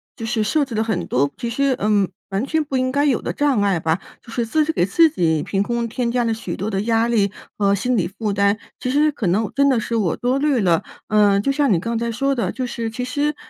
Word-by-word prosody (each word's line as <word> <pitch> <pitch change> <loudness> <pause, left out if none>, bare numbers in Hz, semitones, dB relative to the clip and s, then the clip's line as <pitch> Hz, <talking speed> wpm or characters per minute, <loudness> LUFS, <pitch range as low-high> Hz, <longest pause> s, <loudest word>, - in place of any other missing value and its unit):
就 225 - -6
是 225 -1 -1
设 285 +9 +2
置 260 -4 -6
了 220 - 0
很 220 -6 -1
多 140 +3 +1
其 235 -1 -4
实， 275 +2 +1
嗯， 205 -2 +2 0.2
完 195 +5 -1
全 315 +2 0
不 280 -3 -2
应 255 0 0
该 285 +1 +2
有 275 -5 +2
的 - - -3
障 280 -7 +1
碍 200 -3 +2
吧。 160 0 0 0.2
就 230 - -13
是 235 0 -1
自 310 +7 +2
己 310 - 0
给 180 - +1
自 325 - +4
己 160 - 0
凭 195 -1 -1
空 235 +2 -1
添 240 +1 -2
加 245 0 +1
了 230 - 0
许 205 -6 -5
多 200 +4 -3
的 195 - -1
压 225 +1 +1
力 210 -4 +2 0.3
和 200 -1 +2
心 245 +5 0
理 185 - +1
负 210 +3 -3
担， 200 +1 +2 0.2
其 250 - -3
实 300 +3 +3
可 225 -9 -3
能 200 +3 +1
真 280 0 +3
的 260 -3 +3
是 230 +1 -1
我 190 -7 +1
多 255 +3 0
虑 285 -5 +2
了。 170 -4 +2 0.3
呃， 205 -2 +4
就 275 - +1
像 280 -5 +2
你 175 - +3
刚 230 +6 -2
才 235 0 -2
说 275 +5 0
的， 230 -9 -2
就 255 - -3
是 230 -2 -4
其 250 +3 -5
实 290 +4 -1
230 Hz, 290 characters per minute, -21 LUFS, 200-260 Hz, 0.3 s, 自